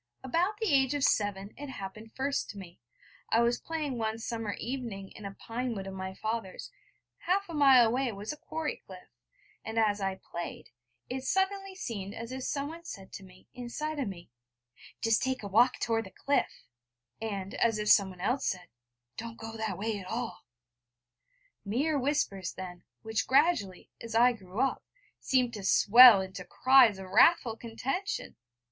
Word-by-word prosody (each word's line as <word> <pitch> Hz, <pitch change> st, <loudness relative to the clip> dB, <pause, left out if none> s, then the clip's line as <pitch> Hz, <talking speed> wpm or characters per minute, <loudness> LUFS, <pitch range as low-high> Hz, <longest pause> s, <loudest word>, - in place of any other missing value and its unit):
About 350 Hz, +10 st, 0 dB
the 445 Hz, -, -2 dB
age 270 Hz, 0 st, +3 dB
of 285 Hz, -, -1 dB
seven 205 Hz, -3 st, +1 dB
it 290 Hz, 0 st, -7 dB
happened 215 Hz, -1 st, -8 dB
first 275 Hz, +1 st, -1 dB
to 205 Hz, -, -8 dB
me. 180 Hz, -3 st, -11 dB, 0.5 s
I 230 Hz, -, +4 dB
was 235 Hz, +1 st, +2 dB
playing 300 Hz, -6 st, -3 dB
one 220 Hz, 0 st, -1 dB
summer 225 Hz, -2 st, -4 dB
evening 230 Hz, -7 st, -5 dB
in 215 Hz, -, -11 dB
a 195 Hz, 0 st, -7 dB
pine 240 Hz, +1 st, -4 dB
wood 195 Hz, -2 st, -5 dB
of 195 Hz, -, -6 dB
my 190 Hz, 0 st, -6 dB
father's; 220 Hz, -, -4 dB, 0.5 s
half 395 Hz, +3 st, 0 dB
a 340 Hz, -, -8 dB
mile 270 Hz, -5 st, +7 dB
away 250 Hz, +2 st, 0 dB
was 205 Hz, +5 st, -5 dB
a -, -, -11 dB
quarry 315 Hz, 0 st, -4 dB
cliff; 185 Hz, -1 st, -14 dB, 0.5 s
and 220 Hz, +1 st, -6 dB
as 210 Hz, -2 st, +2 dB
I 195 Hz, -1 st, -1 dB
played, 175 Hz, -2 st, -8 dB, 0.4 s
it 260 Hz, +1 st, -4 dB
suddenly 385 Hz, +4 st, 0 dB
seemed 210 Hz, -, -5 dB
as 230 Hz, +2 st, -7 dB
if 260 Hz, 0 st, -5 dB
someone 300 Hz, +4 st, -4 dB
said 195 Hz, -, -9 dB
to 195 Hz, -, -8 dB
me, 185 Hz, -1 st, -17 dB
inside 290 Hz, +5 st, -4 dB
of 265 Hz, -, -1 dB
me: 175 Hz, -9 st, -9 dB, 0.7 s
'Just 225 Hz, -1 st, +2 dB
take 260 Hz, -3 st, -1 dB
a -, -, -4 dB
walk 240 Hz, +6 st, +4 dB
toward 225 Hz, -1 st, 0 dB
the -, -, -11 dB
cliff'; 280 Hz, +8 st, -1 dB, 0.6 s
and 200 Hz, -3 st, -4 dB
as 225 Hz, -2 st, +1 dB
if 210 Hz, 0 st, -3 dB
someone 190 Hz, -3 st, +4 dB
else 250 Hz, +7 st, 0 dB
said: 180 Hz, -3 st, -3 dB, 0.5 s
'Don't 230 Hz, 0 st, -7 dB
go 225 Hz, 0 st, -8 dB
that 220 Hz, -1 st, -3 dB
way 215 Hz, 0 st, -2 dB
at 185 Hz, -, -9 dB
all' 230 Hz, +3 st, -4 dB, 1.2 s
mere 280 Hz, +9 st, 0 dB
whispers 225 Hz, -, -1 dB
then, 180 Hz, -1 st, -8 dB, 0.2 s
which 220 Hz, 0 st, -1 dB
gradually, 265 Hz, -, +2 dB
as 230 Hz, -1 st, -6 dB
I 245 Hz, +2 st, +6 dB
grew 195 Hz, 0 st, -5 dB
up, 270 Hz, -, 0 dB, 0.4 s
seemed 250 Hz, -3 st, +1 dB
to 210 Hz, -3 st, -6 dB
swell 225 Hz, +2 st, +8 dB
into 190 Hz, -1 st, -6 dB
cries 255 Hz, -2 st, +5 dB
of 190 Hz, -1 st, -9 dB
wrathful 245 Hz, -, +5 dB
contention! 255 Hz, -, -4 dB
230 Hz, 175 wpm, -30 LUFS, 200-265 Hz, 1.2 s, swell